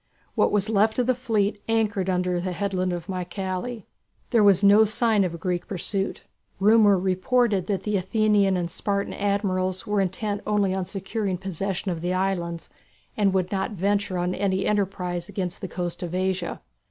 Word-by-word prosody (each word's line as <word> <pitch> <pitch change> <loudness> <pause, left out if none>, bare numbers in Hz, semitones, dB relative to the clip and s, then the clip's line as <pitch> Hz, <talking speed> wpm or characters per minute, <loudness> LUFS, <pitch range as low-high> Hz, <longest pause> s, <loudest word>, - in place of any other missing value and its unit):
What - - +2
was 205 0 +2
left 220 0 +2
of 250 - +2
the 255 - +3
fleet 220 -5 -1
anchored 215 -4 +1
under 180 -1 0
the 185 0 -3
headland 185 -1 -1
of 175 -2 -4
Mycale. 190 +5 -4 0.5
There 230 -4 +4
was 200 -1 +5
no 205 +2 +7
sign 215 -1 +2
of 175 -2 -2
a - - -7
Greek 175 +1 -2
pursuit. 195 +1 -2 0.4
Rumour 210 0 +5
reported 195 +2 +1
that 200 -2 -1
the 210 -1 0
Athenian 200 0 +2
and 175 -1 -3
Spartan 200 +2 -2
admirals 190 -2 -1
were 210 -2 +1
intent 200 +2 -2
only 205 -3 +2
on 190 -1 -2
securing 195 0 -3
possession 190 +1 -3
of 165 -2 -4
the 180 +1 -1
islands, 175 -3 -2 0.4
and 205 -2 +2
would 185 -1 0
not 195 +1 -1
venture 200 0 0
on 180 +1 0
any 190 0 0
enterprise 185 -3 -1
against 190 -2 -4
the 190 - -4
coast 175 0 -4
of 175 0 -4
Asia. 185 -1 -2
195 Hz, 175 wpm, -25 LUFS, 180-205 Hz, 0.5 s, no